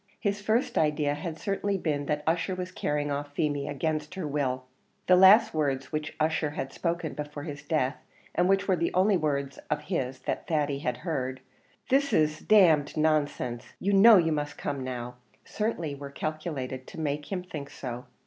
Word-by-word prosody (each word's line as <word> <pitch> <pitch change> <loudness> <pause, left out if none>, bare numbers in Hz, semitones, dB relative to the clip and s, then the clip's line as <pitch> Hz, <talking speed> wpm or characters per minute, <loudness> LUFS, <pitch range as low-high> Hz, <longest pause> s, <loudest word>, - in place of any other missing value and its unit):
His 205 -2 -1
first 220 +4 +1
idea 150 -1 +1
had 155 +2 -5
certainly 200 +2 -1
been 145 -5 -2
that 150 0 -1
Ussher 170 +3 0
was 180 0 -5
carrying 145 -4 -1
off 145 0 -4
Feemy 145 -2 0
against 155 +3 -2
her 185 -5 -3
will; 135 -3 -1 0.4
the 185 - +6
last 195 +5 +7
words 140 -4 -1
which 155 -1 -3
Ussher 155 0 +1
had 140 -2 -5
spoken 170 -2 -2
before 150 -1 -6
his 145 -2 -6
death, 145 -4 0 0.4
and 180 +1 +2
which 195 0 +2
were 190 - +4
the 170 0 0
only 195 +2 +4
words 140 -5 -1
of 150 0 0
his 135 -6 -2
that - - -3
Thady 145 -3 0
had 125 -3 -2
heard, 130 -5 -2 0.5
"This 280 +2 +2
is 155 0 +2
d - - -18 0.3
d 145 - -4 0.2
nonsense; 145 -6 0
you 200 +2 0
know 210 +2 +9
you 165 -2 +3
must 145 -1 -2
come 140 -2 -3
now," 125 -1 -5 0.3
certainly 190 -9 -2
were 140 0 -7
calculated 140 -3 -4
to - - -9
make 150 0 -3
him 185 -2 -2
think 150 -6 -7
so. 125 -1 -6
150 Hz, 185 wpm, -28 LUFS, 140-175 Hz, 0.5 s, know